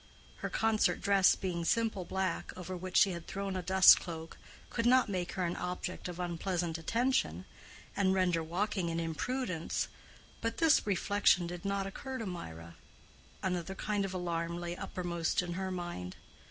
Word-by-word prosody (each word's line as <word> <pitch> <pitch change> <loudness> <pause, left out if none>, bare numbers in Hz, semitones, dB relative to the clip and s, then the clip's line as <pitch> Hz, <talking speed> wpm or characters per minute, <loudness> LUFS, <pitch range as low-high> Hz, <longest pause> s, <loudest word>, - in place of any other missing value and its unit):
Her - - -4
concert 220 -1 +2
dress 195 -2 +5
being 175 -3 -3
simple 220 -1 +1
black, 190 -2 -2
over 185 0 -5
which 185 +1 -2
she 195 - +6
had 170 -2 -6
thrown 195 -1 -3
a 185 - -1
dust 190 +1 +8
cloak, 165 -2 -7 0.4
could 230 0 0
not 255 -2 +5
make 180 -3 -2
her 185 -2 -1
an 170 - -2
object 180 +1 -4
of 180 0 -7
unpleasant 175 -1 -2
attention, 195 - 0 0.5
and 195 -2 +3
render 180 -3 +2
walking 175 +2 -1
an 165 0 -1
imprudence; 170 - -2 0.5
but 230 0 -2
this 320 -8 +4
reflection 200 -2 +3
did 175 +2 -6
not 200 0 0
occur 260 +7 -5
to 225 - -4
Mirah: 85 - -7 0.7
another 180 0 -2
kind 205 0 -1
of 190 -1 -3
alarm 170 -1 -2
lay 175 0 -4
uppermost 175 -2 -1
in 175 -1 -4
her 190 +1 -3
mind. 175 - -5
185 Hz, 165 wpm, -32 LUFS, 170-200 Hz, 0.7 s, dust